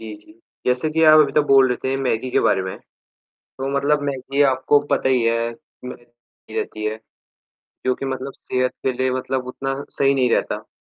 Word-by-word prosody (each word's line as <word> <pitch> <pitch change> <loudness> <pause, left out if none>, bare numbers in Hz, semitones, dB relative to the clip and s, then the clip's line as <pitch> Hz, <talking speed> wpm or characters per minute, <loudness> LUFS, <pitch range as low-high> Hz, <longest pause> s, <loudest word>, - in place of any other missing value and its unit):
जी, 110 -1 -8
जी। 105 0 -19 0.3
जैसे 125 +5 +1
कि 160 +1 +1
आप 155 0 +8
अभी 140 -2 +2
तो 150 - +3
बोल 135 -2 +5
रहे 125 - 0
थे 130 +1 0
मैगी 125 0 -1
के - - +2
बारे 95 - +2
में। 95 - -5 0.6
तो 135 0 -7
मतलब 145 +1 +2
मैगी 140 0 -1
आपको 135 +1 +3
पता 140 - +1
ही 130 -2 +2
है, 115 0 +1 0.3
मै 125 - -6 0.6
गी - - -7
रहती 110 0 -4
है, 110 0 -2 0.9
जो 130 0 +2
कि - - -6
मतलब 135 0 -4
सेहत 130 0 -1
के 130 - +3
लिए 130 0 +1
मतलब 130 0 -3
उतना 135 +2 -4
सही 140 0 +2
नहीं 125 -2 +2
रहता। - - -3
130 Hz, 200 wpm, -21 LUFS, 125-140 Hz, 0.9 s, आप